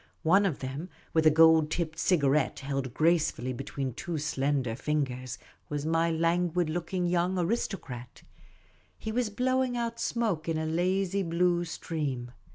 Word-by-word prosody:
One 195 +5 +5
of 155 - -3
them, 135 +7 -5 0.2
with 160 -1 +4
a - - +10
gold 160 0 +6
tipped 160 0 -2
cigarette 145 -6 +2
held 135 -2 -3
gracefully 155 -3 +1
between 135 0 -4
two 170 +6 -4
slender 140 -4 0
fingers, 130 -3 -2 0.3
was 145 0 -3
my 165 +1 +2
languid 170 0 +1
looking 175 +2 -2
young 175 +1 +1
aristocrat. 170 - -3 0.7
He 220 - -5
was 240 0 0
blowing 255 +2 0
out 235 -1 -3
smoke 210 -10 -1
in 160 - 0
a 160 - -1
lazy 185 +4 +1
blue 175 0 +1
stream. 145 -8 -4
165 Hz, 145 wpm, -29 LUFS, 145-180 Hz, 0.7 s, a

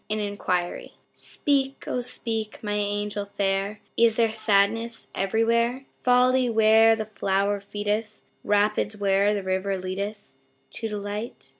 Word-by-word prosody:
An 215 0 -1
Inquiry 190 -4 -2 0.2
Speak, 275 -1 -1
O 250 - -1
speak, 225 -3 -3
my 205 -1 -2
angel 205 0 -2
fair, 195 +1 0
Is 230 -1 +4
there 225 -2 +2
sadness 220 +2 +1
everywhere 235 +6 +1
Folly 250 0 +3
where 225 0 +5
the 220 -1 -4
flower 200 -1 0
feedeth 210 +2 -3 0.2
Rapids 210 +1 +1
where 200 0 +2
the 200 - -3
river 190 +1 -1
leadeth 200 +3 -5 0.4
To 225 - -4
delight? 210 +2 -5
210 Hz, 125 wpm, -25 LUFS, 200-225 Hz, 0.4 s, where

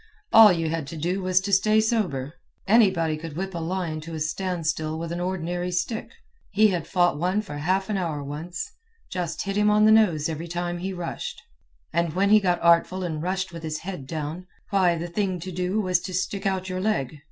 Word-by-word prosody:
All 220 -2 +10
you 165 -2 0
had 160 -3 -3
to 165 - -7
do 180 +5 -1
was 185 0 +3
to 200 +1 -3
stay 215 +3 +4
sober. 185 - 0 0.3
Anybody 190 -8 +4
could 160 -1 -8
whip 190 +1 -3
a 170 - -3
lion 165 -2 -3
to 165 +1 -7
a - - -4
standstill 155 -1 -2
with 165 0 -5
an 170 - -3
ordinary 180 0 -2
stick. 180 +6 -2 0.4
He 210 +1 +4
had 175 -4 -2
fought 175 -5 +2
one 185 +5 +1
for 145 -8 -7
half 190 +5 0
an 210 - -1
hour 160 -6 -2
once. 155 +5 -5 0.4
Just 175 -3 -3
hit 195 -1 -3
him 210 0 +3
on 210 0 +5
the 215 - +6
nose 180 -9 +4
every 165 +1 -4
time 175 0 -3
he 190 +2 -3
rushed, 175 -2 -5 0.5
and 170 -1 +1
when 200 +2 +2
he 215 - +8
got 180 -3 +1
artful 170 +2 +4
and 160 -4 -3
rushed 185 +2 -2
with 165 - -7
his 155 -1 -4
head 180 -9 -6
down, 160 +3 -5 0.2
why, 180 -4 +3
the 165 - -4
thing 185 +1 -1
to 185 +3 -6
do 180 +4 -1
was 185 -4 +2
to 180 +1 -6
stick 195 +2 -1
out 190 -1 -1
your 185 0 -3
leg. 155 - -1
180 Hz, 215 wpm, -25 LUFS, 165-190 Hz, 0.5 s, All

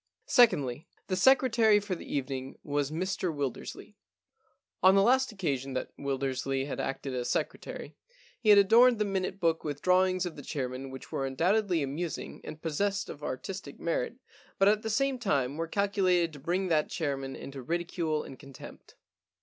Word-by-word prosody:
Secondly, 155 - +3 0.2
the 185 - +1
secretary 230 -1 +5
for 205 -2 -4
the 175 - -7
evening 135 -1 -3
was 145 -1 -1
Mr 185 +2 -2
Wildersley. 145 -4 -5 0.9
On 190 +1 +7
the 195 - +5
last 260 +3 +3
occasion 140 -10 -2
that 130 - -4
Wildersley 135 -1 -2
had 145 - -5
acted 135 0 -3
as 125 -1 -2
secretary - - -3 0.4
he 215 - 0
had 205 - +9
adorned 230 +5 +6
the 210 - +1
minute 190 -1 -2
book 165 -2 +1
with 145 -2 -5
drawings 185 0 +3
of 175 - -5
the 145 - -8
chairman 130 -2 -4
which 130 0 -10
were 135 - -1
undoubtedly 175 +4 +1
amusing 155 +5 -4
and 155 - -9
possessed 200 +5 -1
of 145 - -11
artistic 140 +4 -6
merit, 170 +7 -1 0.4
but 195 - +4
at 210 +1 +4
the 220 - -3
same 270 +3 +1
time 140 - 0
were 165 +1 -3
calculated 185 -3 +1
to 145 - -10
bring 180 +6 -1
that 155 -2 +2
chairman 135 -4 -3
into 135 -1 -8
ridicule 165 +1 -2
and 130 - -11
contempt. 140 -3 -13
165 Hz, 165 wpm, -29 LUFS, 140-195 Hz, 0.9 s, had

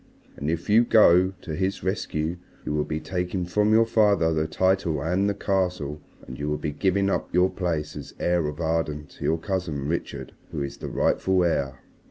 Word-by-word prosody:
And 70 - -3
if 85 +1 -2
you 110 +3 +5
go 95 -5 +5
to 80 - -4
his 95 +4 -2
rescue 85 -3 -2 0.3
you - - -2
will 75 0 0
be 75 - -3
taking 90 +1 -2
from 105 +4 +2
your 115 +1 +5
father 100 -7 +3
the 80 0 0
title 95 -2 +1
and 90 +7 +1
the 100 - -1
Castle, 90 -7 -1 0.2
and 65 - -9
you 75 +1 -2
will 75 - 0
be 75 - -3
giving 95 +6 +1
up 100 - -1
your 90 +2 +3
place 80 -5 -2
as 75 - -9
heir 85 -3 +1
of 75 +2 -6
Arden 80 -2 -1
to - - -12
your 80 - +2
cousin 80 -6 -3
Richard 85 +2 -4 0.2
who 70 - -3
is 70 - -6
the - - -6
rightful 95 -1 +2
heir." 70 -6 -1
85 Hz, 200 wpm, -25 LUFS, 75-95 Hz, 0.3 s, you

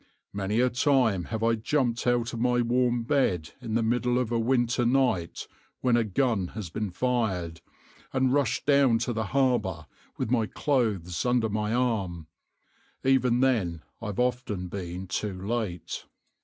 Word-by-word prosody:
Many 100 +3 0
a 125 0 +2
time 125 - +2
have 110 0 -4
I 115 0 +3
jumped 120 +1 0
out 120 -1 +1
of 115 - -4
my 125 0 +2
warm 120 0 +1
bed 105 - +1
in 115 -3 -3
the 115 - +2
middle 120 +2 +1
of 125 -2 -1
a 115 - +1
winter 120 +1 +1
night 120 -9 +1 0.3
when 125 -2 +3
a 120 - +3
gun 110 -2 0
has 95 -6 -5 0.2
fired, 95 -7 -1 0.5
and 130 -1 +2
rushed 140 -3 +1
down 140 -4 +4
to 120 +1 -2
the 110 -1 -2
harbour 110 - 0 0.3
with 125 -3 -2
my 115 -4 +2
clothes 105 - 0
under 120 -2 +2
my 105 +1 -1
arm; 105 -9 -1 0.8
even 130 -2 +3
then 95 - +1 0.2
I've 105 -2 -4
often 125 -7 -1
been 90 -1 -5
too 95 0 -3
late." 100 -4 -3
115 Hz, 155 wpm, -27 LUFS, 100-125 Hz, 0.8 s, down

